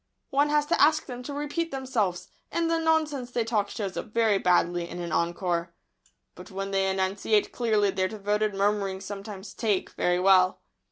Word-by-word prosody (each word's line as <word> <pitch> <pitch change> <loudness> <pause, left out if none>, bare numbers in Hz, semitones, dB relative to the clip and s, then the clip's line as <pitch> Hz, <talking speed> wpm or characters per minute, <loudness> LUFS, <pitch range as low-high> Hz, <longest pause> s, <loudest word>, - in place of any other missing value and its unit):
One 285 +2 +3
has 295 0 +2
to - - +1
ask 310 +1 +4
them 250 -2 -7
to 250 - -7
repeat 295 +4 -2
themselves, 225 - -2 0.2
and 335 -1 0
the 330 - +2
nonsense 310 -6 +1
they 240 -1 0
talk 215 -3 0
shows 200 -4 -4
up - - -4
very 220 -2 +2
badly 175 -1 +2
in - - -7
an 170 -1 -4
encore. 170 0 -1 0.6
But - - -12
when 195 0 -4
they 195 0 +1
enunciate 195 +2 +1
clearly 215 -4 +1
their 185 0 0
devoted 210 0 -1
murmurings 195 -1 0
sometimes 200 -1 -7
"take" 210 -5 -1
very 180 0 +1
well. 185 0 +4
205 Hz, 175 wpm, -27 LUFS, 190-250 Hz, 0.6 s, ask